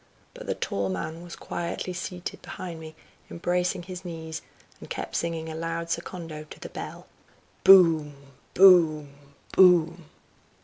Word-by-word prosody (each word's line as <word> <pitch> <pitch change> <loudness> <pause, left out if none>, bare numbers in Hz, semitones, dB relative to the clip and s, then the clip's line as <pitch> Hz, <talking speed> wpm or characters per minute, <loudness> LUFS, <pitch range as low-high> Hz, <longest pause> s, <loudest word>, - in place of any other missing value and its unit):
But - - -11
the - - -1
tall 100 -1 -2
man 125 - -4
was 175 -1 -9
quietly 175 +1 -4
seated 180 0 -6
behind 175 -3 -7
me, 160 -1 -10 0.3
embracing 180 +1 -1
his 185 +1 -8
knees, 160 -2 -6 0.4
and - - -12
kept - - -5
singing 165 -1 -2
a 160 - -6
loud 165 +1 -4
secondo 165 -2 -5
to 155 - -13
the - - -8
bell: - - -8 0.6
"Boom! 165 -6 +6 0.4
boom! 165 -6 +6 0.4
boom!" 175 -2 +4
170 Hz, 135 wpm, -26 LUFS, 160-180 Hz, 0.6 s, Boom